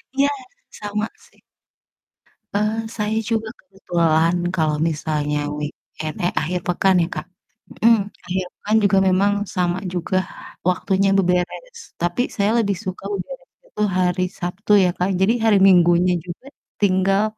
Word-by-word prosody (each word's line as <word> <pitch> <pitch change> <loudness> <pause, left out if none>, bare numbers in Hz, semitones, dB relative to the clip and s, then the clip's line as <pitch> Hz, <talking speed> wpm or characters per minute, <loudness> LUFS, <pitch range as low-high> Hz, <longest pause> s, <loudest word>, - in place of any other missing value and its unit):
Iya, 280 +1 +3 0.5
sama 210 +1 -2 0.2
sih. - - -28 1.2
Eee, 215 +2 0
saya 215 +1 -1
juga 225 -1 -1
kebetulan 170 -3 +1 0.2
kalau 155 -3 +1
misalnya 150 -1 -2 0.2
weekend 155 +1 -6
eh 175 - +2
akhir 180 +4 -2
pekan 185 +2 +2
ya, 165 - +1
Kak? - - -4 0.6
Mhm. 230 -2 +6 0.3
Akhir 185 +1 -1 0.2
pekan 215 +2 0
juga 200 -1 +4
memang 195 +2 +3 0.2
sama 180 -1 +1 0.2
juga 180 +1 -1 0.5
waktunya 195 +2 +1
beberes. 185 - -1 0.2
Tapi 175 +6 0
saya 205 0 +1
lebih 200 -2 0
suka 185 0 -5
beberes - - -7 0.2
itu 210 - -6 0.2
hari 180 0 +1 0.2
Sabtu 180 +4 -4
ya, 180 - +3
Kak. 180 +2 0
Jadi 195 +4 +3
hari 215 -2 +5
Minggunya 175 0 +5
juga 180 +9 -9 0.3
tinggal 195 +1 +3
185 Hz, 135 wpm, -21 LUFS, 175-210 Hz, 1.2 s, Mhm